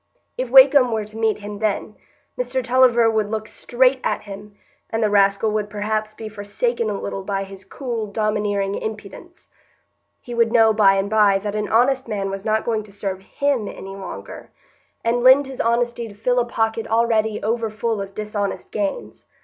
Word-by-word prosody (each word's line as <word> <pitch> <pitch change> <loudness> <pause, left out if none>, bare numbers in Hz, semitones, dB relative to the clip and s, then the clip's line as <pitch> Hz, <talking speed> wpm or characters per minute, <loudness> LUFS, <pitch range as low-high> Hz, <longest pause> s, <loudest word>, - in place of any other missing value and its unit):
If 255 -1 -3
Wakem 265 -1 +7
were 220 -2 -1
to 215 +1 -14
meet 225 -1 +1
him 205 0 -8
then, 210 0 -2 0.4
Mr 250 +1 -2
Tulliver 245 -2 +4
would 220 -2 0
look 215 0 -3
straight 255 +3 +1
at - - -1
him, 205 0 -10 0.3
and 225 0 -1
the 210 - +1
rascal 200 +1 +3
would 210 -1 -2
perhaps 215 +1 -3
be 220 - -7
forsaken 215 +2 -2
a 205 - -3
little 195 - -4
by 195 0 -2
his 195 0 -11
cool, 230 +1 -5
domineering 205 -1 -1
impudence. 220 - -8 0.7
He 245 - -9
would 230 -1 +2
know 225 -2 +5
by 200 -2 +5
and 195 +1 0
by 205 -2 +4
that 205 +1 -4
an 210 -1 -2
honest 255 +3 +2
man 200 -3 -3
was 195 0 -5
not 220 0 0
going 225 -2 0
to 210 -1 -14
serve 195 -1 -4
him 265 +1 -1
any 195 0 -8
longer, 195 -1 -9 0.5
and 235 +1 +1
lend 260 +3 +6
his 265 -1 -5
honesty 235 0 0
to 205 - -12
fill 245 +4 +1
a 240 - +1
pocket 225 -1 -1
already 220 -1 +1
over 225 +1 -1
full 220 0 -2
of 195 0 -8
dishonest 210 -1 -4
gains. 200 -2 -4
215 Hz, 185 wpm, -21 LUFS, 205-235 Hz, 0.7 s, Wakem